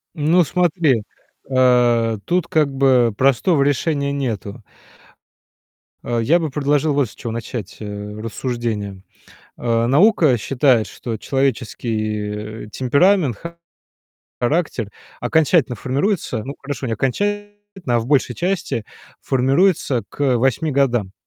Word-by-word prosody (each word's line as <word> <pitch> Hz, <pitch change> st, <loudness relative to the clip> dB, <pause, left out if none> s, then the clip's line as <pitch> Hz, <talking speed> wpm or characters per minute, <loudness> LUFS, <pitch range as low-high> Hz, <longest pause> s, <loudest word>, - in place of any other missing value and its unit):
Ну 165 Hz, +3 st, +3 dB
смотри, 160 Hz, -, +1 dB, 0.5 s
э, 120 Hz, -3 st, +3 dB
тут 180 Hz, -1 st, 0 dB
как 150 Hz, -3 st, +1 dB
бы 130 Hz, -4 st, +3 dB
простого 140 Hz, +4 st, +3 dB
решения 140 Hz, 0 st, 0 dB
нету. 115 Hz, -5 st, -4 dB, 1.4 s
А, 120 Hz, -1 st, -1 dB
я 155 Hz, +10 st, +3 dB
бы 160 Hz, -2 st, -2 dB
предложил 145 Hz, +1 st, +1 dB
вот 140 Hz, -5 st, +1 dB
с -, -, -16 dB
чего 115 Hz, -, -6 dB
начать, 115 Hz, -3 st, -6 dB
э, 105 Hz, 0 st, -7 dB
рассуждения. 110 Hz, -4 st, -4 dB, 0.6 s
А, 115 Hz, -1 st, 0 dB
наука 150 Hz, -, +4 dB
считает, 125 Hz, 0 st, +2 dB
что 115 Hz, -3 st, -6 dB
человеческий, 110 Hz, -5 st, -2 dB
э, -, -, -12 dB
темперамент, 140 Hz, -, +2 dB, 1.0 s
характер 125 Hz, -, -1 dB, 0.3 s
окончательно 155 Hz, -6 st, +2 dB
формируется 135 Hz, -, -1 dB
ну, 140 Hz, +3 st, -6 dB
хорошо, 140 Hz, -2 st, -5 dB
не 115 Hz, -, -1 dB
окончательно, 205 Hz, -, -1 dB, 0.4 s
а -, -, +3 dB
в 115 Hz, -, -6 dB
большей 135 Hz, -3 st, +2 dB
части, 175 Hz, -, -2 dB, 0.4 s
формируется 135 Hz, 0 st, +2 dB
к 135 Hz, -4 st, 0 dB
8 135 Hz, +5 st, +1 dB
годам. 120 Hz, -8 st, +1 dB
130 Hz, 115 wpm, -20 LUFS, 115-150 Hz, 1.4 s, наука